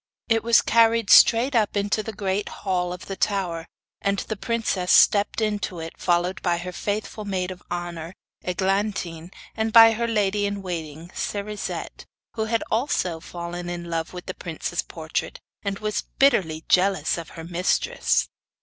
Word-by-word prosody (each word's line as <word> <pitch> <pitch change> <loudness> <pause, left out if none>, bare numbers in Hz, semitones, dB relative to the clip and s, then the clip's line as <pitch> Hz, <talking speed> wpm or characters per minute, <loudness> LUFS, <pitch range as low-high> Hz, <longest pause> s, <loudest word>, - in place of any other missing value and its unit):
It 225 -1 +2
was 230 0 +5
carried 230 -2 +3
straight 245 +4 +7
up 215 -2 +2
into 205 +2 +1
the 220 - -5
great 195 0 -2
hall 180 -3 -2
of 180 +1 -7
the 195 - -5
tower, 180 -5 -1 0.3
and 200 0 +1
the 220 - -3
princess 215 -5 -1
stepped 205 +2 +5
into 205 -5 -1
it, 165 0 -7
followed 175 +2 0
by 175 -2 +1
her 180 +1 -5
faithful 205 +4 -3
maid 190 -2 -2
of 180 -1 -9
honour, 175 0 -5 0.3
Eglantine, 190 -2 -1 0.3
and 220 0 -1
by 225 0 +9
her 235 +1 -1
lady 205 -2 +1
in 200 -1 -4
waiting 165 -2 -6
Cerisette, 210 0 -4 0.3
who 220 -1 -2 0.2
also 200 - 0
had - - -19
fallen 175 0 -5
in 170 -1 -5
love 165 0 -2
with 180 -1 -8
the 185 - -4
prince's 170 0 -4
portrait 160 -1 -4 0.2
and 200 -1 -3
was 215 0 -2 0.2
bitterly 165 - +3
jealous 185 -4 +3
of 165 - -8
her 165 - -6
mistress. 175 +2 +1
190 Hz, 160 wpm, -24 LUFS, 175-210 Hz, 0.3 s, by